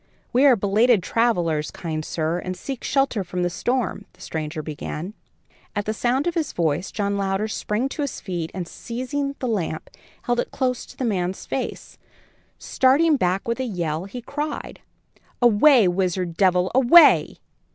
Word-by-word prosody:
"We 255 +4 +4
are 260 - +7
belated 210 +1 +3
travellers, 175 -10 +1
kind 155 -2 -5
sir, 160 +2 -2
and 185 0 -5
seek 270 -3 -6
shelter 270 -7 +1
from 180 0 -3
the 175 - 0
storm," 240 +5 -2
the - - -21
stranger 155 0 -4
began. 155 +5 -6 0.6
At 205 +2 -2
sound 250 +5 0
of 345 - 0
his 325 -4 -2
voice, 165 +1 -1
John 200 -1 -1
Louder 195 +2 -1
sprang 215 +3 -2
to 300 - -5
his 285 -3 -3
feet, 175 -4 -4
and, 180 -3 -4
seizing 275 +6 -4
the 255 - -3
lamp, 175 -8 -3 0.3
held 240 0 0
it - - -1
close 255 -2 -2
to - - -15
the 260 - -2
man's 185 -4 -2
face. - - -5 0.6
Starting 295 +5 +3
back 185 -5 0
with 235 +2 -1
a - - 0
yell, 170 -6 -3
he 240 +5 -8
cried: 295 +3 -5 0.6
"Away! 240 0 +5
wizard, 180 -1 -1
devil, 180 0 +2
away! 265 +7 +6
205 Hz, 160 wpm, -23 LUFS, 175-255 Hz, 0.6 s, are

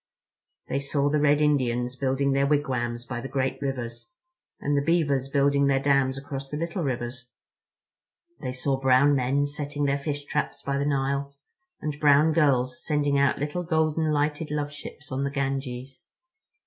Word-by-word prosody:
They - - -1
saw 140 +1 0
the 150 - +2
Red 145 0 +3
Indians 125 -4 +1
building 135 +1 0
their 140 +1 +2
wigwams 125 -5 -1
by 120 -1 -4
the 135 - -5
great 135 0 -2
rivers—and 140 - -5
the 140 - +3
beavers 145 -4 +1
building 140 0 +3
their 135 -1 +3
dams 135 -1 +2
across 135 -1 -6
the 150 - -4
little 170 +3 -3
rivers; 125 -3 -3 1.1
they 130 - -4
saw 130 +1 -1
brown 135 +2 +5
men 135 +2 +1
setting 145 0 -3
their 140 0 +1
fish 145 0 -4
traps 150 - -2
by 140 0 -1
the 140 - 0
Nile, 140 0 -1 0.5
and 150 -1 -4
brown 150 +1 +5
girls 135 -5 +2
sending 145 -2 +1
out 140 -1 +3
little 150 +5 -2
golden 160 -2 +1
lighted 150 +1 0
love 145 -1 -2
ships 150 0 -10
on 130 +1 -1
the 140 - 0
Ganges. 135 -1 -3
140 Hz, 160 wpm, -26 LUFS, 135-150 Hz, 1.1 s, brown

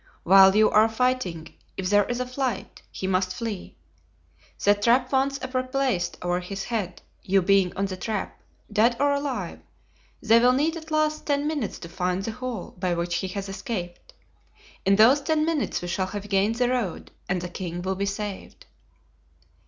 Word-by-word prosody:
While 190 +1 +7
you 215 0 +6
are 215 +1 +5
fighting 220 -9 -1 0.2
if 190 0 -2
there 205 -1 +5
is 245 0 -3
a 250 - -1
fight, 255 0 -4
he - - -5
must 185 -1 0
flee. 225 -5 -5 0.9
The 205 - +6
trap 240 +5 +2
once 275 0 +1 0.2
replaced 255 -7 -1
over 175 0 0
his 195 +2 -5
head, 205 -7 -4 0.2
you 190 0 +2
being 195 -1 +3
on 195 - +1
the 190 -1 -4
trap, 210 +2 -4 0.3
dead 230 +3 +3
or 285 0 +3
alive, 280 -3 -3 0.6
they 225 +1 +5
will 250 +1 +5
need 305 +5 +1
at 320 -1 -9
least 310 0 0
ten 285 0 +1
minutes 295 -8 -2
to 170 - -9
find 180 +2 -2
the 225 - -3
hole 250 -4 -6
by 180 -1 0
which 170 0 -1
he 190 - -2
has 195 +1 -5
escaped. 195 -3 -6 0.7
In 195 - +6
those 240 +7 +6
ten 310 +1 +1
minutes 320 - -1
we - - -4
shall 185 +2 -1
have 205 +1 -6
gained 200 +3 +2
the 245 +1 +1
road 245 -8 -2 0.2
and 185 -1 +1
the 180 - -5
king 175 -1 -5
will 190 +1 -1
be 200 +1 -2
saved." 200 0 -6
210 Hz, 180 wpm, -25 LUFS, 185-255 Hz, 0.9 s, While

